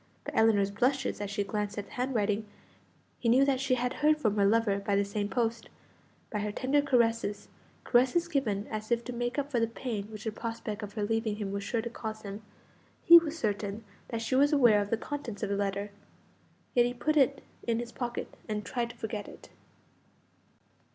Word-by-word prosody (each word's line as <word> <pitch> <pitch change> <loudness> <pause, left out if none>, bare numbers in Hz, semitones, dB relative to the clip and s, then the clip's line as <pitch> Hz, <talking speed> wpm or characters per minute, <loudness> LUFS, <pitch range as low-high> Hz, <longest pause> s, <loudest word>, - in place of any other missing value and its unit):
By - - -5
Ellinor's 205 -3 +4
blushes, 250 +2 0
as 205 - -3
she 205 0 -1
glanced 210 +1 -3
at 205 - -3
the - - -19
handwriting, 220 -4 -1 0.7
he 235 - +1
knew 260 +4 +6
that 275 -2 +2
she 270 -1 +2
had 250 0 -1
heard 305 +1 +5
from 215 -8 +1
her 200 -1 +4
lover 210 -2 +2
by 200 0 0
the 200 0 +2
same 205 0 -2
post; 230 +2 -1 0.6
by 210 - -1
her 210 0 -2
tender 270 +6 +2
caresses 230 -6 +1 0.3
caresses 260 +8 +3
given 220 - -1
as 215 0 -5
if 235 -1 +1
to 250 - -6
make 240 +2 -2
up 285 0 -2
for 245 - +2
the 230 - +2
pain 225 -3 -4
which 215 0 -9
the 220 - -2
prospect 225 -1 -5
of 205 -1 -7
her 215 - -2
leaving 225 0 0
him 205 -2 -4
was 200 0 -3
sure 225 +2 -1
to 235 - -3
cause 220 -2 -6
him 200 +1 -6 0.6
he 340 0 +11
was 325 -1 -5
certain 205 -3 -2 0.2
that 230 -2 -3
she 230 - -2
was 285 +3 +5
aware 240 -8 +5
of 205 - -3
the 230 - +1
contents 235 -5 -5
of 205 - -1
the 200 - 0
letter. 200 0 -2 0.8
Yet 240 -1 +5
he 245 - -4
put 305 +5 0
it 275 -1 +3 0.2
in 230 -1 +2
his 235 0 -4
pocket, 240 -1 -4 0.2
and 210 -1 -2
tried 240 -3 -2
to 235 - -11
forget 215 -2 -4
it. - - -13
225 Hz, 210 wpm, -30 LUFS, 205-250 Hz, 0.8 s, he